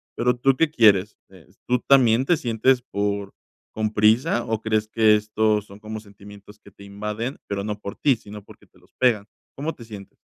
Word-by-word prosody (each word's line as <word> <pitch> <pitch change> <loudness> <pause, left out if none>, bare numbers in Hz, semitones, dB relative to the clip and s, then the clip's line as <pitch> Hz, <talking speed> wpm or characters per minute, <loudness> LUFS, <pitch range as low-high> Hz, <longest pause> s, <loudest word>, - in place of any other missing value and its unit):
pero, 125 0 +1
¿tú 130 +2 +2
qué 165 +1 +2
quieres?, 105 -7 +3
eh, 95 -4 -18 0.2
¿tú 125 0 +1
también 130 -2 +4
te 175 - +3
sientes 125 -1 +1
por 100 -4 -3 0.4
con 110 -1 -2
prisa, 110 +3 +2
o 110 -1 -2
crees 110 -1 0
que 110 -1 +4
estos 105 0 0
son 100 0 -14
como 110 +1 -7
sentimientos 100 0 -15
que 100 - -17
te 100 - -17
invaden, 105 +6 -5
pero 100 -1 -3
no 105 0 -4
por 100 -1 -7
ti, 140 -3 +2
sino 105 -1 -11
porque - - -18
te - - -27
los - - -27
pegan?, 115 -5 +2 0.3
¿cómo 150 +4 -4
te 115 - -13
sientes? 105 -3 -11
110 Hz, 200 wpm, -23 LUFS, 105-120 Hz, 0.4 s, también